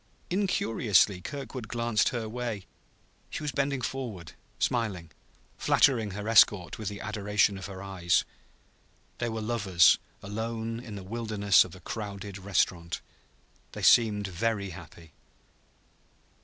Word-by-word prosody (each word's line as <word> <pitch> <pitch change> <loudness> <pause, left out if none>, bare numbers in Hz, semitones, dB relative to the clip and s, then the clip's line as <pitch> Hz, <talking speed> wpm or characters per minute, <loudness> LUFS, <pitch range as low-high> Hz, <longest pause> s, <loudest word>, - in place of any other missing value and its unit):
Incuriously 115 - +2
Kirkwood 130 -1 -6
glanced 115 -1 +1
her 120 -4 -3
way. 115 -4 -4 0.6
She - - -5
was 150 - -1
bending 140 0 -1
forward, 115 -11 -5 0.3
smiling, 100 -9 -1 0.5
flattering 115 -7 +3
her 105 +1 -5
escort 105 -5 +4
with 110 - -5
the 100 0 -7
adoration 105 -1 +1
of 95 - -7
her 95 -1 -8
eyes. 95 -3 +1 0.9
They 120 - -1
were 110 0 -4
lovers 105 -7 +4 0.2
alone 115 +2 -4
in 115 -4 -8
the 100 - -7
wilderness 105 -2 +3
of 90 - -10
the 95 - -12
crowded 100 0 -6
restaurant. 90 -3 0 0.7
They - - -7
seemed 105 -4 +5
very 100 +1 -1
happy. 85 -2 -12
105 Hz, 125 wpm, -28 LUFS, 95-115 Hz, 0.9 s, seemed